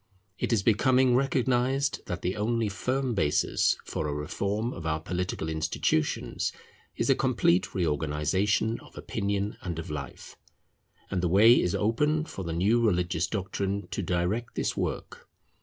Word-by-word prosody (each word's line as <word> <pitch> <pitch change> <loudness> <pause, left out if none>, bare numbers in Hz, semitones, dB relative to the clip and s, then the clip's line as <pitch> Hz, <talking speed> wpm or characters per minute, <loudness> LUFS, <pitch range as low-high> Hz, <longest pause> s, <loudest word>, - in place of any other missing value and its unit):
It - - -1
is 110 -4 +2
becoming 125 +3 +4
recognized 130 +1 +1
that 90 -2 -4
the 90 +2 -1
only 110 +1 0
firm 125 +6 -1
basis 75 -8 +2
for - - -3
a 75 - -2
reform 100 +10 -2
of 80 -1 -6
our 80 0 0
political 90 0 -3
institutions, 80 -1 -1 0.4
is - - +1
a - - +5
complete 85 +2 +1
reorganization 85 +7 0
of - - -16
opinion 100 -1 -2
and 85 -4 -4
of 80 0 -6
life; 70 -2 -7 0.7
and 95 - 0
the 90 - +1
way 105 +6 +7
is 90 -7 +2
open 150 +9 +1
for 95 - -7
the 85 - -4
new 100 +8 +2
religious 90 -5 +1
doctrine 100 0 -3
to - - -2
direct 90 +7 -1
this - - -1
work. - - -4
100 Hz, 150 wpm, -28 LUFS, 85-115 Hz, 0.7 s, way